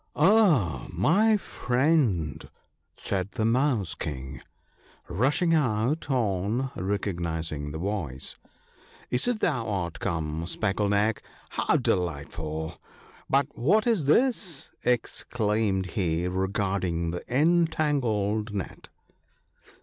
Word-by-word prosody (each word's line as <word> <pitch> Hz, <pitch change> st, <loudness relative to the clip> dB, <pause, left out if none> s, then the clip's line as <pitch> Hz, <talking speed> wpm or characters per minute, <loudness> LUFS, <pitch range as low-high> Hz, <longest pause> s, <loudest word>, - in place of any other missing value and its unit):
' -, -, -43 dB
Ah, 155 Hz, -, +4 dB
my 195 Hz, -, +3 dB
friend! 125 Hz, -, 0 dB, 0.2 s
' -, -, -49 dB
said^the 100 Hz, +4 st, -2 dB
Mouse 115 Hz, -, +2 dB
king, 65 Hz, -4 st, -6 dB, 0.7 s
rushing 145 Hz, -, +2 dB
out 135 Hz, +1 st, +1 dB
on 115 Hz, +1 st, 0 dB
recognizing 85 Hz, -6 st, -2 dB
the 75 Hz, -, -5 dB
voice, 80 Hz, -8 st, -3 dB, 0.4 s
* -, -, -26 dB
is 125 Hz, -, 0 dB
it 245 Hz, -3 st, 0 dB
thou 120 Hz, -9 st, 0 dB
art 90 Hz, -5 st, -2 dB
come, 80 Hz, -1 st, -2 dB
Speckle 100 Hz, +1 st, 0 dB
neck! 105 Hz, +2 st, +2 dB, 0.3 s
how -, -, +1 dB
delightful! 80 Hz, -1 st, -2 dB, 0.2 s
— -, -, -24 dB
But 140 Hz, +1 st, +1 dB
what 200 Hz, -, +3 dB
is 220 Hz, -, +2 dB
this? 195 Hz, -, +1 dB
' -, -, -37 dB
exclaimed 110 Hz, -4 st, 0 dB
he, 85 Hz, -2 st, 0 dB
regarding 95 Hz, -2 st, -1 dB
the 90 Hz, -, -5 dB
entangled 130 Hz, -9 st, +1 dB
net. 95 Hz, -, -6 dB
105 Hz, 110 wpm, -27 LUFS, 85-140 Hz, 0.7 s, Ah